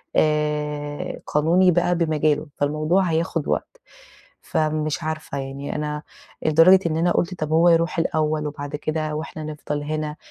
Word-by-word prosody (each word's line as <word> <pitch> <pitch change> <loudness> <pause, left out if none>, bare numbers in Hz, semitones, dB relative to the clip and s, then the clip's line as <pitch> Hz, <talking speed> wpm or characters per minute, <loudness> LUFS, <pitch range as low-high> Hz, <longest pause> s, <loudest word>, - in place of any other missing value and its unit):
آآ 150 -1 -1
قانوني 170 +5 +4
بقى 175 +1 +2
بمجاله، 155 -2 +1
فالموضوع 155 +6 +1
هياخد 165 -2 -1
وقت، - - -2 0.7
فمش 155 -1 -1
عارفة 155 -3 -4
يعني 135 +1 -5
أنا 150 0 -3 0.4
لدرجة 165 +5 +6
إن 155 - -2
أنا 170 +2 +2
قُلت 180 +2 0
طب 155 -3 -4
هو 165 +2 +5
يروح 170 +1 +2
الأول 155 -2 0
وبعد 145 0 -5
كده 155 0 -2
وإحنا 155 0 -5
نفضل 150 -1 -4
هنا 155 0 -3
155 Hz, 140 wpm, -23 LUFS, 150-165 Hz, 0.7 s, لدرجة